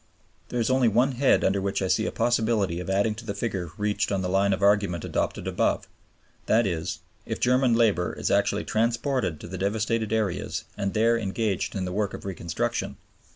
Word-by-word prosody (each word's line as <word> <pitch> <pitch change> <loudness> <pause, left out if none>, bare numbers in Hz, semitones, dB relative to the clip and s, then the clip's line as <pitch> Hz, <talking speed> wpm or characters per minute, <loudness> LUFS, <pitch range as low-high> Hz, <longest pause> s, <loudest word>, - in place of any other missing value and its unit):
There 125 - -2
is 115 +2 +1
only 130 -2 +4
one 120 +5 +3
head 130 +1 +3
under 95 +1 +2
which 100 0 -1
I 95 - -1
see - - +1
a - - -2
possibility 110 -7 +1
of 90 - -6
adding 100 +3 +2
to 110 +2 -9
the 100 -3 -4
figure 100 -5 -3
reached 105 0 0
on 95 -1 0
the 90 - -1
line 100 +2 +2
of 95 +1 -1
argument 100 -5 +2
adopted - - -2
above; - - 0 0.6
that 115 +1 +4
is, 85 -5 -3 0.3
if - - -3
German 125 -1 +3
labor 105 -7 +2
is - - -2
actually - - +1
transported 115 - 0
to - - -9
the 95 +1 -6
devastated 110 +3 0
areas 110 -5 -1
and 100 -1 -3
there 115 +2 +3
engaged 105 -1 -2
in 95 -2 -2
the 90 - -4
work 105 0 -1
of - - -10
reconstruction. 85 -3 -3
105 Hz, 200 wpm, -26 LUFS, 95-115 Hz, 0.6 s, only